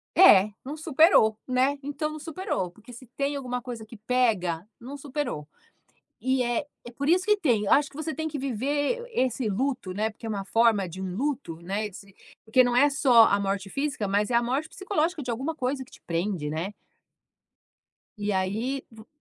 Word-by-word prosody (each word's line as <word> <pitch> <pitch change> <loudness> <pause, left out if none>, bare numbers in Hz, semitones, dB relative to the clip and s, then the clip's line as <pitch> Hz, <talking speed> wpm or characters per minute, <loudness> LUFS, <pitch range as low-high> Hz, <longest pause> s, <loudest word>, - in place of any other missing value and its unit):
É, 210 - +8
não 285 +3 -5
superou, 310 - +4
né? 260 +3 +2
Então, 290 +2 -3
não 310 - -7
superou, 325 - -3
porque 215 +7 -16
se 245 +2 -11
tem 280 +1 -1
alguma 250 -2 -3
coisa 235 -3 -7
que 230 - -12
pega, 210 -7 0
não 270 +5 -8
superou 270 - -4 0.7
e 260 0 +1
é 240 +4 -1 0.2
é 240 - -8
por 280 +5 -2
isso 365 +2 +3
que 420 0 +4
tem. 240 - +1
Acho 285 +4 +4
que - - -19
você 315 +1 -3
tem 315 0 -3
que 300 -2 -4
viver 285 - -1
esse 250 - 0
luto, 250 -1 -1
né, 215 +3 0
porque 220 +2 -12
é 225 - -3
uma 200 -2 -3
forma 225 -5 +3
de 185 +3 -8
um 185 -1 -4
luto, 260 - -2
né, 200 +4 -2
esse 195 0 -13 0.3
porque 255 +4 +5
não 245 -1 +1
é 285 +4 +6
só 255 -5 +6
a 200 - +2
morte 195 0 -2
física, 275 -6 -2
mas 205 +3 +1
é - - +2
a 235 - +5
morte 275 +6 -1
psicológica 355 -4 -1
de 250 - -7
alguma 275 +7 -3
coisa 260 0 -2
que - - -21
te - - -16
prende, 170 -2 -1
né? 170 +7 -3 1.4
E 205 0 -1
aí 220 +9 -1
vo 220 0 -14
245 Hz, 195 wpm, -26 LUFS, 205-285 Hz, 1.4 s, É